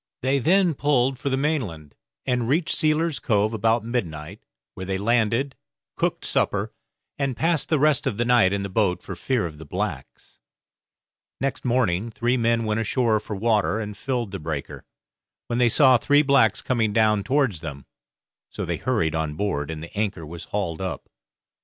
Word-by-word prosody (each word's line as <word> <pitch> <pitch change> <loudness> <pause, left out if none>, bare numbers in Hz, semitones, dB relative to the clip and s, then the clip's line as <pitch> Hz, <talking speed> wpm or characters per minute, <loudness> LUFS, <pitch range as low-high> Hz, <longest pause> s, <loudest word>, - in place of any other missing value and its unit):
They 135 +2 +2
then 180 +5 +3
pulled 135 -2 +1
for 140 - -2
the 130 - 0
mainland, 115 - -2 0.3
and 125 -3 0
reached 155 +4 +1
Sealer's 155 0 +1
Cove 105 0 +1
about 115 +1 +1
midnight, 85 -11 -4 0.3
where 95 - -7
they 95 0 -1
landed, 115 +5 +1 0.4
cooked - - -1
supper, - - 0 0.5
and 135 -4 -1
passed 165 -1 +1
the 155 - +3
rest 145 -1 +2
of 110 -6 -2
the 120 - 0
night 120 -6 +4
in 100 0 -1
the - - -2
boat 95 -3 0
for 95 - -6
fear 120 +4 -1
of 75 -3 -7
the - - -8
blacks. - - -5 1.0
Next 135 -1 -2
morning 115 -5 +1
three 120 +2 0
men 115 -1 +1
went 110 0 0
ashore 115 0 +1
for 105 - -6
water 110 0 +1
and 105 -2 -5
filled 120 -5 -3
the 95 - -5
breaker, 75 -3 -5 0.6
when 120 0 -2
they 120 -1 +4
saw 130 +1 +6
three 145 +5 +3
blacks 135 -7 +3
coming 115 -5 0
down 110 -2 +3
towards 130 - +1
them; 70 -5 -7 0.6
so - - -5
they - - -2
hurried 95 -12 0
on 80 -2 -2
board, 80 -6 -2
and 80 -1 -5
the 85 - -11
anchor 100 -6 -2
was 85 +2 -9
hauled 95 -5 -3
up. 95 -2 -5
115 Hz, 180 wpm, -24 LUFS, 95-130 Hz, 1.0 s, saw